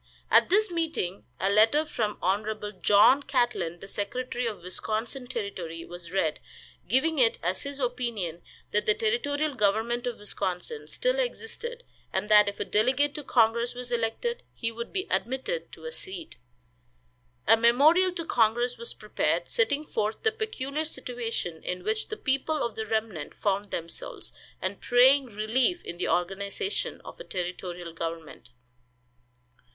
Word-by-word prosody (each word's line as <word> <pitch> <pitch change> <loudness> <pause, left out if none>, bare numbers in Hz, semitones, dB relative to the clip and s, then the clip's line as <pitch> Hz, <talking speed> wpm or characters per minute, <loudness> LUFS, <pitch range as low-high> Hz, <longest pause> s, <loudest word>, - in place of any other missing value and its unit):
At - - +6
this 415 +2 +4
meeting 320 - -2
a 195 - +2
letter 225 +9 +5
from 215 -8 -2
Hon. 210 +2 0
John 225 +7 +6
Catlin, 240 -12 0
the 195 - -8
secretary 245 +5 -2
of 205 -6 -5
Wisconsin 220 +7 -3
Territory, 190 -9 -5
was 175 -1 -9
read, 160 -5 +1 0.5
giving 300 +5 +2
it 230 -3 +4
as 180 +2 0
his 280 0 -3
opinion 235 - -2 0.3
that 210 - +1
the 210 - +5
territorial 285 +7 0
government 225 +2 +1
of 240 - -3
Wisconsin 205 - -4
still - - 0
existed, 480 0 -3 0.3
and 210 - -2
that 210 -1 +8
if 200 - -9
a - - -1
delegate 260 +7 +2
to 300 - -5
congress 235 -1 +3
was 245 0 -5
elected 240 - -1
he 230 -1 -2
would 235 +1 -6
be 380 0 -2
admitted 265 - -1
to - - -11
a 475 - -4
seat. 380 -7 -6 1.1
A 225 - +7
memorial 290 +11 +5
to 335 -2 -4
congress 240 -1 +2
was 470 - -4
prepared, - - -1
setting 310 -12 +2
forth 215 -6 -2
the 440 - +4
peculiar 315 -10 -2
situation 240 - -4
in 180 0 -4
which 215 +2 -1
the 430 - -5
people 275 +3 0
of 235 - -2
the 220 +1 -4
remnant 215 -8 -2
found 200 0 0
themselves, 170 -2 -6 0.3
and - - -3
praying 260 +3 +6
relief 240 - +1
in 170 - -6
the 180 - -1
organization 200 - -1
of - - -11
a - - -6
territorial 180 - -4
government. 165 -6 -6
235 Hz, 150 wpm, -28 LUFS, 200-285 Hz, 1.1 s, that